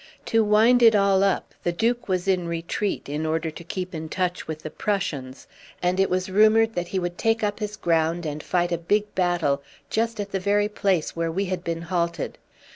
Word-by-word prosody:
To 225 -1 +3
wind 220 +4 +5
it 225 -2 +7
all 195 -1 +4
up, 195 - 0
the 175 - 0
Duke 235 +7 0
was 185 -1 -1
in 180 -3 +1
retreat 170 +5 -2
in 150 +2 -3
order 160 +1 -1
to 165 - -10
keep 185 +2 -5
in 160 -1 -5
touch 180 +1 -2
with 155 -1 -6
the 155 - -6
Prussians, 145 -11 -3 0.3
and 180 +1 0
it 195 - +3
was 185 0 0
rumoured 215 +3 +4
that 175 -3 -2
he 190 - -3
would 175 -1 -3
take 225 0 +1
up 205 0 -1
his 210 0 -4
ground 165 -2 +1
and 150 0 -4
fight 175 +1 0
a 170 - 0
big 205 +4 0
battle 175 -6 +1 0.3
just 230 0 0
at 200 -1 -4
the 195 - -1
very 205 +2 +2
place 195 -6 0
where 165 0 -1
we 195 +4 -1
had 180 -1 -3
been 165 -1 -3
halted. 170 -1 -2
185 Hz, 210 wpm, -24 LUFS, 170-205 Hz, 0.3 s, it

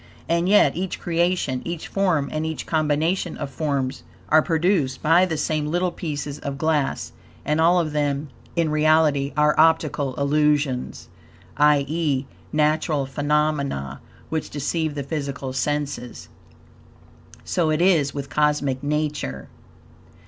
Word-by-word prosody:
And 170 +2 +1
yet 200 -9 +5
each 185 +2 -3
creation, 170 -6 0
each 170 -1 -5
form, 180 -8 +1
and 155 0 -1
each 160 0 -4
combination 160 +3 0
of 140 - -5
forms, 135 -1 -2 0.3
are 155 0 +6
produced 160 -5 0
by 170 +4 +5
the 160 -3 -2
same 155 -1 -1
little 175 +3 0
pieces 145 -4 -5
of 140 -1 -5
glass; 150 -1 0 0.3
and 150 +2 +1
all 175 +2 +5
of 160 -3 -1
them, 145 0 -1 0.3
in 165 -3 +1
reality, 155 -2 +3
are 150 0 +4
optical 155 -4 +2
illusions; 145 -2 0 0.5
i.e., 145 -1 +2 0.3
natural 150 -1 +1
phenomena, 140 - -1 0.3
which 160 -1 -3
deceive 150 +1 -2
the 140 - -3
physical 140 -2 -4
senses. 140 -2 -3 1.1
So 165 -3 0
it 155 0 +1
is 170 -6 +3
with 140 -1 -5
Cosmic 145 -2 0
Nature. 145 - -2
150 Hz, 125 wpm, -23 LUFS, 140-160 Hz, 1.1 s, are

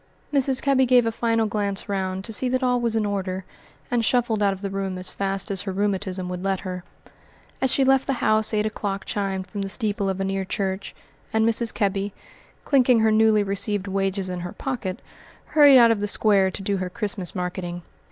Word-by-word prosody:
Mrs. 270 -2 +2
Kebby 265 -2 +3
gave 245 -1 +5
a 225 - 0
final 230 0 0
glance 205 -2 -2
round 190 -1 -3
to 225 - -3
see 250 +4 +1
that 255 +1 0
all 250 -1 +2
was 230 -2 0
in 220 -1 +1
order, 190 -2 -3 0.5
and 240 -2 +1
shuffled 230 -2 +1
out 200 -1 +3
of 195 0 -6
the 200 - -3
room 195 -1 -3
as 185 0 -4
fast 195 0 -3
as 195 - -2
her 200 - -4
rheumatism 190 -1 -2
would 180 0 -5
let 195 -1 -1
her. 180 -2 -6 0.8
As 265 -1 +2
she 275 - +4
left 270 0 +3
the 275 - +1
house 215 -3 +1
eight 215 -1 0
o'clock 200 -2 -3
chimed 195 -2 -2
from 200 +2 -6
the 195 - -3
steeple 205 -2 0
of 190 0 -3
a 195 - -1
near 195 0 -2
church, 190 0 -3 0.4
and 220 0 +2
Mrs. 230 0 +5
Kebby, 200 0 -1 0.5
clinking 250 -4 +3
her 220 0 +3
newly 215 -1 +4
received 200 0 -1
wages 195 0 -1
in 180 -1 -4
her 175 0 -6
pocket, 235 -8 -5 0.4
hurried 290 -3 +6
out 235 -2 +7
of 225 - 0
the 205 - -2
square 200 -2 +3
to 195 - -7
do 200 0 -1
her 185 -1 -3
Christmas 195 -1 -3
marketing. 180 -1 -4
200 Hz, 210 wpm, -23 LUFS, 190-225 Hz, 0.8 s, out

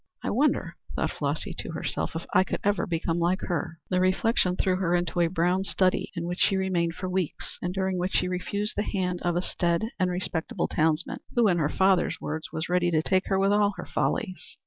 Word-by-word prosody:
"I - - -1
wonder," - - +1 0.2
thought - - 0
Flossy - - -2
to - - -5
herself, - - -3
"if 165 - -4
I 185 - +6
could - - -3
ever 205 0 +1
become 165 0 -1
like 175 +2 +1
her." 170 -2 -2
The 180 - +3
reflection 185 0 +2
threw 185 0 +1
her 175 -2 +1
into 175 0 -1
a 170 - +4
brown 180 +2 +1
study 185 -1 +1
in 170 - -3
which 175 +1 -3
she 195 - +3
remained 175 -3 0
for 185 - -4
weeks, 185 -3 -3
and 180 - -1
during 190 -1 -1
which 180 +2 -1
she - - +2
refused 200 +3 -2
the - - +1
hand 185 -4 -1
of 175 -1 0
a 175 - 0
staid 175 +6 0
and 185 -1 +2
respectable 180 +2 -2
townsman, 160 +1 0 0.2
who, 240 -3 +5
in 175 -3 +3
her 150 -2 +2
father's 190 0 +2
words, 155 +1 -4
was 160 +1 -3
ready 175 0 +2
to 160 -2 +2
take 185 +1 +1
her 195 - +2
with 195 +1 +3
all 205 -1 +3
her - - -5
follies. 200 -8 -2
180 Hz, 220 wpm, -27 LUFS, 170-190 Hz, 0.2 s, I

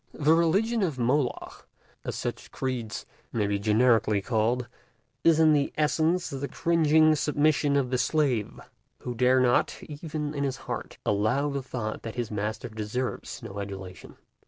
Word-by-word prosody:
The 150 +1 +3
religion 195 +8 +2
of 160 -8 0
Moloch—as 125 +2 -3
such - - -5
creeds 125 -5 -4 0.3
may 110 -3 0
be 100 0 0
generically 110 0 +3
called—is 120 +6 -1
in 150 -3 +4
essence 160 +3 +1
the 140 0 -3
cringing 160 -2 +3
submission 145 -2 +2
of 135 -3 +1
the 125 - +1
slave, 130 -5 0 0.4
who 125 - -4
dare 125 +2 +3
not, 125 -1 +2
even 150 0 -5
in 140 -1 -2
his 135 -1 -1
heart, - - -5
allow 110 +8 +1
the 140 0 -2
thought 120 -4 -5
that 115 - -7
his 120 -3 -3
master 105 +1 -3
deserves 110 +4 -4
no 100 -3 -7
adulation. 95 -2 -8
130 Hz, 140 wpm, -27 LUFS, 110-150 Hz, 0.4 s, in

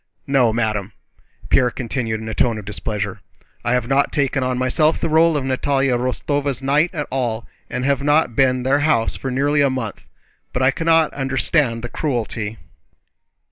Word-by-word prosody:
"No, 135 -4 +3
madame!" 110 -3 -1 0.6
Pierre 125 - +4
continued 115 -2 -3
in 110 - -7
a 110 - -3
tone 115 -1 +1
of 105 - -8
displeasure, 105 -1 -4 0.4
"I 120 - +1
have 125 -2 0
not 140 +2 +2
taken 140 -1 0
on 130 -1 -1
myself 140 +5 +2
the 165 - -2
role 160 0 +4
of 135 - -2
Natalie 135 +1 +1
Rostóva's 130 +3 -1
knight 145 +5 +3
at 150 -5 -3
all, 120 -4 -2 0.2
and 125 - -3
have 140 -1 +1
not 145 -4 +2
been 130 -2 +2
to - - -3
their 140 - +4
house 145 -7 +1
for 135 - -4
nearly 145 +3 +1
a 140 - +4
month. 125 -6 -4 0.5
But 125 - 0
I 130 - +5
cannot 165 +1 +2
understand 135 -2 0
the - - -2
cruelty..." 115 -7 -3
130 Hz, 180 wpm, -20 LUFS, 115-145 Hz, 0.6 s, I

